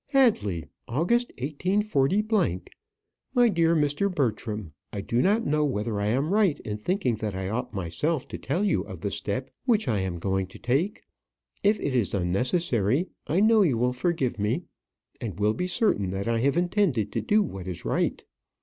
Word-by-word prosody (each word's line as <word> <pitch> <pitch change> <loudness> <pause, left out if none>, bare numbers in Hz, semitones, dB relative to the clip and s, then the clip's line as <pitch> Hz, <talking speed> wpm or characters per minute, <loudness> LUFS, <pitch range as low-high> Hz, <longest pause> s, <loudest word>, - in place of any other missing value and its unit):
Hadley, 155 - +2 0.2
August, 180 - +1
184. 190 - +1 0.9
My 245 -1 +6
dear 170 -3 +3
Mr. 150 +6 +1
Bertram, 110 - -2 0.2
I 100 - -4
do 115 +5 0
not 210 - +2
know 150 +1 +2
whether 110 -6 -1
I 100 - 0
am 135 - +1
right 200 -8 +3
in 105 -1 -5
thinking 175 - 0
that 105 -2 -3
I 95 0 -3
ought 125 +4 -3
myself 100 - -2
to - - -6
tell 165 +9 -1
you 205 - +2
of - - -9
the - - -2
step - - -3
which 225 - +2
I 110 -5 +1
am 95 -2 -2
going 95 +2 -1
to 95 - -13
take. 140 - -1 0.6
If 205 +1 +3
it 140 - -2
is 115 -6 +1
unnecessary, 120 - +1 0.2
I 175 +6 +2
know 220 0 +5
you 150 - +3
will 125 +2 +1
forgive 130 -4 -1
me, 105 +1 0 0.6
and 105 -3 -5
will 105 +1 +3
be 180 +11 -2
certain 175 - +1
that 95 +2 -3
I 115 -1 +1
have 140 +6 +2
intended 175 - +1
to - - -1
do 210 0 +3
what 95 - -6
is 90 -2 -6
right. - - 0
135 Hz, 180 wpm, -26 LUFS, -, 0.9 s, My